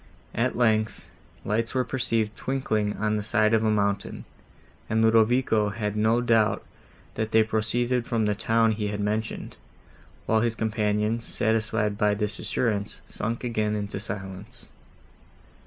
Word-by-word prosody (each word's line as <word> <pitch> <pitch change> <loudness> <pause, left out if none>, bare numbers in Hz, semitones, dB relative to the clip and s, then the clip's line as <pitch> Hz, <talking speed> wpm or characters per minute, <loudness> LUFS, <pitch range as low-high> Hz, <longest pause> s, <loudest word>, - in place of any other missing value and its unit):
At 120 +2 0
length, 110 -2 +1 0.4
lights 115 +3 -1
were 130 - +3
perceived 115 -4 -1
twinkling 110 -6 -1
on 105 +1 0
the - - -1
side 110 +1 +2
of 110 0 +3
a 110 - +2
mountain, 100 -1 -1 0.6
and 110 - +1
Ludovico 110 -1 +3
had 105 0 -3
no 110 +3 +2
doubt, 115 -3 +2 0.5
that 110 0 -3
they 110 0 +5
proceeded 120 +3 0
from 115 -3 +1
the 105 - +2
town 115 +1 +2
he 105 -1 -2
had 105 0 -3
mentioned, 105 +2 -3 0.7
while 110 0 +2
his 115 -1 0
companions, 110 0 0
satisfied 110 -1 0
by 105 -1 +3
this 105 -1 -3
assurance, 105 -4 -2
sunk 115 +2 -4
again 110 -3 0
into 100 -1 -4
silence. 100 +3 -7
110 Hz, 140 wpm, -26 LUFS, 105-115 Hz, 0.7 s, they